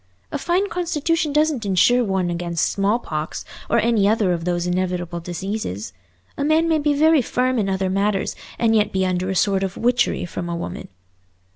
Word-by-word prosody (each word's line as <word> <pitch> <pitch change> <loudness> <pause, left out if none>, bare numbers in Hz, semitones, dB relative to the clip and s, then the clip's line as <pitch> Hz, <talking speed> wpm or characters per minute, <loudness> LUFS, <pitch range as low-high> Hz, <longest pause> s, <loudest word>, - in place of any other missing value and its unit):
A - - -2
fine 360 +4 +1
constitution 330 -3 -1
doesn't 300 -4 +1
insure 210 +6 +3
one 190 -4 0
against 170 -1 -1
smallpox 195 -7 -2 0.2
or - - +3
any 225 -3 +3
other 210 -4 +2
of 170 -1 -4
those 175 -1 0
inevitable 180 -1 -2
diseases. 175 - -4 0.5
A - - +1
man 315 +3 +3
may 320 -1 +2
be 290 0 +1
very 310 0 +5
firm 255 +1 0
in 200 -2 0
other 190 0 0
matters 195 +1 0 0.2
and 225 -1 +2
yet 210 -1 +2
be 190 0 0
under 185 0 -1
a 190 - -1
sort 195 +1 +2
of 195 -1 -3
witchery 245 -4 +1
from 175 0 -5
a 170 - -2
woman." 170 - -6
200 Hz, 180 wpm, -21 LUFS, 180-255 Hz, 0.5 s, very